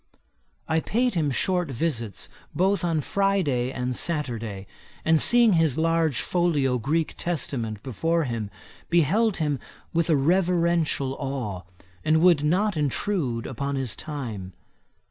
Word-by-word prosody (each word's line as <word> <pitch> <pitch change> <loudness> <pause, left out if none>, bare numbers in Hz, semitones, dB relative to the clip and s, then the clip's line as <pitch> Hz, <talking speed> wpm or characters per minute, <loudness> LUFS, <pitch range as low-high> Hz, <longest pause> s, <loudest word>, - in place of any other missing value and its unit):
I 160 0 +2
paid 245 +8 0
him 160 -5 +1
short 180 +4 0
visits 120 - -3 0.3
both 190 +2 +2
on 165 -3 +1
Friday 160 -10 0
and 125 -1 -3
Saturday, 115 - -2 0.4
and 160 0 +4
seeing 240 +1 +5
his 160 -5 +3
large 160 -5 +1
folio 145 -8 +1
Greek 155 +7 0
Testament 120 - -2
before 165 +6 0
him, 115 -6 -3 0.4
beheld 185 - +3
him 150 -4 -1 0.3
with 170 0 +1
a 160 - +5
reverential 170 -3 +2
awe, 130 -10 -3 0.4
and 155 +1 +3
would 170 -3 +5
not 190 +6 +2
intrude 145 - -1
upon 140 +3 -3
his 130 -5 -2
time. 115 -11 -6
155 Hz, 125 wpm, -25 LUFS, 130-170 Hz, 0.4 s, seeing